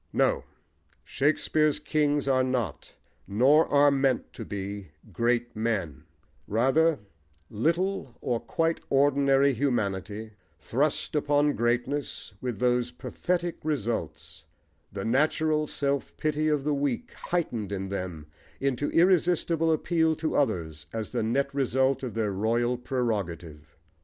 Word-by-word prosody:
No! - - +2 0.6
Shakespeare's 155 +1 +1
kings 150 -1 0
are 130 -1 +3
not, 130 -3 -3 0.3
nor 130 - +4
are 145 0 +5
meant 135 -2 0
to 115 - -7
be, 100 -1 -5 0.3
great 120 0 0
men: 105 - -2 0.4
rather, 135 +9 +3 0.5
little 165 - -1
or 120 -2 -1
quite 165 +5 -1
ordinary 140 0 +4
humanity, 110 -4 -2 0.3
thrust 140 - -1
upon 145 0 +2
greatness, 120 +4 -2
with 125 -4 -3
those 125 -1 +1
pathetic 175 +7 -3
results, 115 - -3 0.5
the 100 0 -5
natural 150 +5 +2
self 140 -1 -2
pity 155 0 0
of 150 -3 +1
the 150 +1 +1
weak 145 - -2
heightened 120 - -3
in 95 -1 -3
them 90 -5 -5 0.3
into 140 +1 0
irresistible 170 -2 +3
appeal 160 0 +2
to 155 0 -2
others 80 - -1
as 110 -1 -4
the - - -1
net 135 +5 0
result 135 0 +1
of 125 -4 -5
their 110 -2 0
royal 115 +5 +1
prerogative. 90 - -4
130 Hz, 120 wpm, -27 LUFS, 110-150 Hz, 0.6 s, are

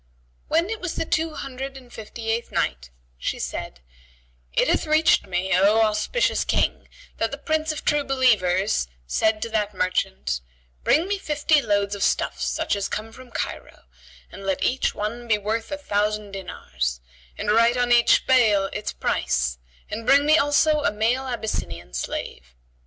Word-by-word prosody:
When 335 +6 +1
it 445 - -4
was 365 -2 -3
the - - -1
Two 320 0 -1
Hundred 270 0 -6
and 250 -2 -15
Fifty 225 +1 -5
eighth 230 +1 -2
Night, 60 -1 -1 0.3
She - - -2
said, 65 - -5 0.7
It - - +2
hath - - +1
reached 310 -5 +4
me, 185 +1 -1
O 205 +4 +4
auspicious 215 - +1
King, - - 0 0.3
that 225 - 0
the 280 - -6
Prince 315 +1 -1
of 310 - -6
True 295 -1 +2
Believers 210 - +2 0.2
said 215 - +1
to 230 - -4
that 210 -2 -1
merchant, 185 - -1 0.4
"Bring 325 +5 +3
me 400 0 -1
fifty 300 -2 +2
loads 205 -3 0
of 200 - -5
stuffs - - 0
such - - 0
as 200 -1 -2
come 220 +1 -4
from 255 +2 -13
Cairo, - - -5 0.5
and - - -10
let 195 -1 -1
each 260 - +1
one 230 +3 -4
be 215 -2 +3
worth 220 +4 -3
a 290 - -2
thousand 210 -5 -1
dinars, 65 - -4 0.4
and - - -1
write 230 +3 +4
on 245 0 +1
each 240 -1 +5
bale 215 -7 +4
its 210 - -3
price; 60 -2 -1 0.3
and 225 0 -5
bring 280 +1 +6
me 305 +1 +6
also 300 +1 +3
a 205 - +2
male 235 +5 0
Abyssinian 85 - -4
slave." - - -5
220 Hz, 170 wpm, -24 LUFS, 195-270 Hz, 0.7 s, bring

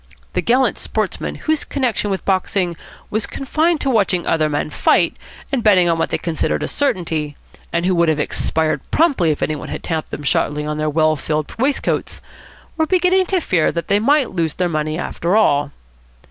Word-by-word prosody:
The - - +1
gallant 255 +3 +2
sportsmen - - -3
whose 315 -1 +1
connection 250 -6 -1
with 190 -1 -3
boxing 185 -2 0 0.4
was 215 0 -1
confined 310 +4 0
to 275 - 0
watching 195 -6 +1
other 155 -2 +1
men 150 +1 -2
fight, - - +2 0.4
and 270 -3 0
betting 190 -5 +5
on 165 -1 +1
what - - 0
they - - 0
considered 165 -2 -1
a - - -1
certainty, 160 - -1 0.3
and 170 +1 0
who 185 - +2
would 170 -2 +3
have 155 - +1
expired 155 -1 0
promptly 280 - +2
if 150 - -1
any 155 - -1
one 145 - -7
had - - -6
tapped 160 -2 -3
them 150 - -6
sharply 150 +1 0
on 150 0 -3
their 155 0 0
well 155 +1 +2
filled 150 +1 -3
waistcoats, 270 +3 0 0.6
were 315 -1 +1
beginning 370 +1 +3
to 380 - +1
fear 180 - +1
that 170 - -4
they 200 - +4
might 280 +4 +2
lose 165 -4 -1
their 180 - 0
money 155 -1 -2
after 175 +1 -1
all. 145 -9 +3
175 Hz, 190 wpm, -19 LUFS, 155-255 Hz, 0.6 s, betting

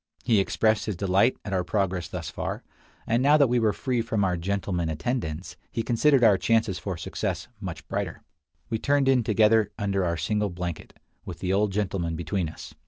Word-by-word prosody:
He 115 -4 +3
expressed 110 +3 +1
his 105 - -1
delight 100 +6 +2
at 100 - -4
our 90 -1 +1
progress 90 -1 -1
thus 85 -3 -6
far; - - -4 0.4
and 115 +2 +1
now 145 +3 +5
that 145 - +6
we 125 -1 +2
were 110 -2 +3
free 125 +1 -1
from 110 -3 -1
our 90 -2 +1
"gentlemen" 90 -1 -2
attendants, 80 - -3
he 115 - -2
considered 130 +3 +3
our 105 -4 +6
chances 110 -5 +1
for 95 -4 -4
success 80 - -3
much - - -7
brighter. - - -4 0.4
We 115 -1 -2
turned 140 +1 +2
in 130 -3 +4
together 110 0 +4
under 100 -3 0
our 85 -1 0
single 105 +4 0
blanket, 85 -2 -6 0.2
with - - -7
the 95 0 -1
old 100 +1 +2
gentleman 95 -4 -1
between 85 +1 -2
us. - - -10
100 Hz, 190 wpm, -26 LUFS, 90-115 Hz, 0.4 s, that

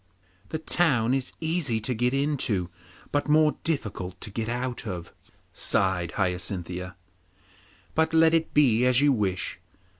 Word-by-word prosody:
'The - - -2
town 140 -7 +2
is 135 -1 -1
easy 160 -8 0
to 110 +4 -1
get 125 +2 +1
into, 130 - 0 0.4
but 145 +1 0
more 155 0 +4
difficult 95 - -3
to 105 - -5
get 110 +2 -3
out 120 -1 -3
of,' 90 -4 -6 0.4
sighed 90 -3 +1
Hyacinthia. 90 -1 -3 1.0
'But 160 0 +2
let 160 0 +5
it 165 -1 +1
be 125 -6 +4
as 125 0 +4
you 145 0 +4
wish. 95 -5 -2
125 Hz, 140 wpm, -26 LUFS, 95-150 Hz, 1.0 s, let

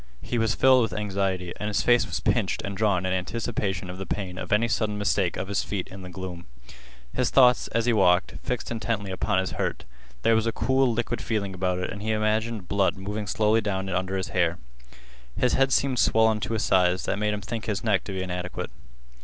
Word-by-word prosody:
He 120 - -2
was 115 0 +1
filled 130 -1 +5
with 115 -3 -1
anxiety, 95 -3 -2
and 105 - -2
his 105 - 0
face 120 0 +4
was - - -3
pinched - - 0
and 100 0 -4
drawn 100 -3 +1
in 95 - 0
anticipation 95 -1 -2
of 90 +1 -7
the 95 - -5
pain 95 -3 -4
of - - -6
any 110 +3 +3
sudden 105 -2 0
mistake 100 -3 +1
of 95 - -3
his 100 0 0
feet 100 -4 -4
in 95 0 -9
the 90 - -8
gloom. 90 -2 -7 0.7
His 125 - +1
thoughts, 125 -2 +5
as 115 0 0
he 120 - +3
walked, 90 -3 +3
fixed 125 -2 -3
intently 110 -3 -2
upon 95 +1 0
his 95 0 0
hurt. - - -3 0.4
There 115 - +4
was 110 0 +2
a - - +2
cool, 130 +1 +2
liquid 120 +1 -2
feeling 105 -4 -2
about 90 0 -1
it 90 - -3
and 100 - -7
he 110 +1 0
imagined 110 -1 0
blood 100 +1 +1
moving 105 +2 -4
slowly 110 +3 +2
down 95 -2 -2
under 95 +1 -1
his 95 - -3
hair. 85 -2 +1 0.8
His 125 - +2
head 135 0 +3
seemed 130 -3 +2
swollen 110 0 +4
to 115 - -2
a - - -1
size 90 -2 +2
that - - -1
made 105 0 +1
him 105 - -6
think 115 +1 -5
his 105 -2 -2
neck 105 -4 +2
to 100 - -5
be 95 -1 -3
inadequate. 90 0 -4
105 Hz, 220 wpm, -26 LUFS, 95-115 Hz, 0.8 s, filled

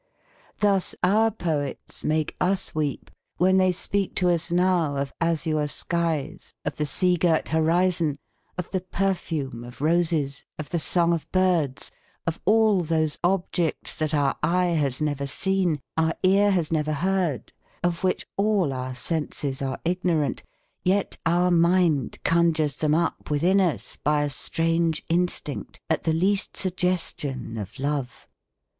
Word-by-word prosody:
Thus 200 -3 +2
our 215 +5 +4
poets 160 -9 -3
make 155 0 0
us 190 +1 +1
weep, 150 -3 -3 0.3
when 185 +2 +4
they 185 0 +4
speak 195 +2 -1
to 180 -1 +3
us 170 0 -1
now 175 -4 +2
of 140 0 -3
azure 160 -2 +1
skies, 165 -1 -3
of 145 - -3
the 150 - -1
sea 180 +5 +2
girt 165 -2 +1
horizon, 165 -1 +2 0.4
of 180 - -5
the 185 - -1
perfume 170 -10 -2
of 120 0 -11
roses, 160 -2 +1
of 155 - -7
the 170 - 0
song 170 +2 +2
of 165 - -4
birds, 175 -8 +1 0.3
of 165 -1 -3
all 215 -2 +4
those 155 -2 0
objects 175 -3 0
that 155 -1 -1
our 145 -3 +1
eye 175 +2 +2
has 140 -4 0
never 145 -2 -1
seen, 180 +1 0 0.2
our 160 0 +1
ear 200 +2 +5
has 175 -6 0
never 155 -1 0
heard, 175 -2 -1 0.3
of 175 0 -1
which 185 - 0
all 200 -8 +2
our 130 0 -4
senses 145 -2 -3
are 135 -1 -2
ignorant, 170 -5 0 0.4
yet 195 +2 0
our 175 +2 +3
mind 170 -4 +3
conjures 165 -4 +2
them 155 -1 +2
up 165 0 -1
within 175 +7 +3
us 175 -5 -1
by 150 0 +1
a 145 - -1
strange 165 +2 0
instinct 170 -4 -2
at 160 - 0
the 160 - +2
least 195 +5 0
suggestion 175 - -1
of 100 +1 -7
love. 140 -2 -3
165 Hz, 145 wpm, -25 LUFS, 150-180 Hz, 0.4 s, ear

